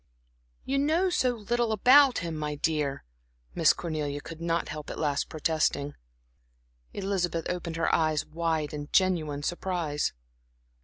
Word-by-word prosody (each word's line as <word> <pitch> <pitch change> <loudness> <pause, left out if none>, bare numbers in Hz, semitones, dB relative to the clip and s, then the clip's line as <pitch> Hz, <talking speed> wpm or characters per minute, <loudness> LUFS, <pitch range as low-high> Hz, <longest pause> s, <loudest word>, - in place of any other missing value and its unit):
"You 275 +1 0
know 325 +6 +2
so 260 -7 +2
little 235 +1 -1
about 255 0 +5
him, 165 -1 -3
my 150 -1 -3
dear," 150 -2 -1 0.5
Miss - - +5
Cornelia 150 -4 -3
could 165 +2 -10
not 170 0 -1
help 155 -1 -6
at - - -6
last 145 -2 -1
protesting. 155 -2 0 1.0
Elizabeth 185 -4 -1
opened 175 -2 -3
her 165 - 0
eyes 155 -2 +2
wide 160 -2 -2
in 145 0 -6
genuine 160 -7 +1
surprise. 175 -3 -1
165 Hz, 135 wpm, -28 LUFS, 150-190 Hz, 1.0 s, about